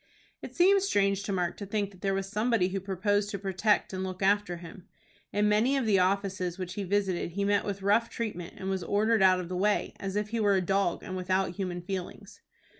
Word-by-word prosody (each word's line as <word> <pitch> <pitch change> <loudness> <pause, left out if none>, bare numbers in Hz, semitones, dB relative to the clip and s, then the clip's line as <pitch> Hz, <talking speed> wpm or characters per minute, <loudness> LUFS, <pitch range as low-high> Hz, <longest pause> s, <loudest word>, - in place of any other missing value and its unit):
It - - -9
seemed 390 +3 +5
strange 200 - +1
to 200 - -4
Mark 180 -3 -1
to 200 - -6
think 205 -1 -1
that 185 -2 -18
there 195 -1 0
was 195 0 -2
somebody 215 -2 +1
who 195 +1 -2
proposed 205 +2 0
to 200 - -3
protect 195 +2 0
and 185 0 -3
look 185 0 -4
after 200 -2 +2
him. 175 +2 -12 0.4
In 210 +1 +2
many 225 +7 +3
of 265 - 0
the 200 -3 +3
offices 185 -1 0
which 185 -1 -5
he 205 - -3
visited 190 -3 -1
he 200 +2 -1
met 205 0 +2
with 200 -1 -4
rough 215 +4 +3
treatment, 205 -7 -5
and 190 - -6
was 190 -1 -1
ordered 215 +4 +2
out 185 -1 +5
of 180 - -5
the 180 - -4
way, 205 +3 +1
as 195 0 -4
if 210 0 -1
he 230 +1 -2
were 205 -2 +3
a - - +3
dog, 195 -1 0
and 185 - -6
without 185 0 0
human 180 -2 -4
feelings. 185 -1 -6
195 Hz, 230 wpm, -29 LUFS, 185-205 Hz, 0.4 s, seemed